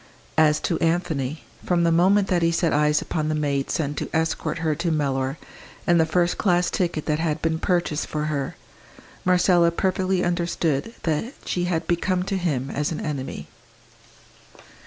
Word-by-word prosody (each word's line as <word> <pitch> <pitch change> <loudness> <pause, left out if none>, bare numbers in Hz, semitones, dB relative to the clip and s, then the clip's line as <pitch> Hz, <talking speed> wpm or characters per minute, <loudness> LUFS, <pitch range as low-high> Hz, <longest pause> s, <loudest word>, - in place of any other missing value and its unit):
As 155 -1 +4
to 170 - -1
Anthony, 160 -4 -1 0.2
from 175 -1 +1
the 170 - +3
moment 190 +4 +4
that 180 -2 +2
he 165 0 +3
set 165 0 +1
eyes 150 0 +3
upon 155 -1 -2
the 155 - 0
maid 140 -2 -1
sent 145 -4 -2
to - - -3
escort 160 -1 -1
her 160 -2 0
to 170 +3 -2
Mellor, 135 -3 0 0.5
and 175 -1 +4
the 160 - +2
first 175 +2 +1
class 180 -3 +2
ticket 170 -4 -1
that 150 -1 0
had 160 -1 0
been 160 0 0
purchased 175 -5 0
for 150 0 -3
her, 150 +1 -2 0.7
Marcella 180 -1 +4
perfectly 185 +1 0
understood 170 0 -1
that 165 - -1
she 175 -1 -1
had 170 -2 -1
become 180 +2 0
to 195 +1 -2
him 140 -7 -1
as 150 +2 -1
an 160 - -3
enemy. 140 -3 -4
165 Hz, 170 wpm, -24 LUFS, 150-175 Hz, 0.7 s, As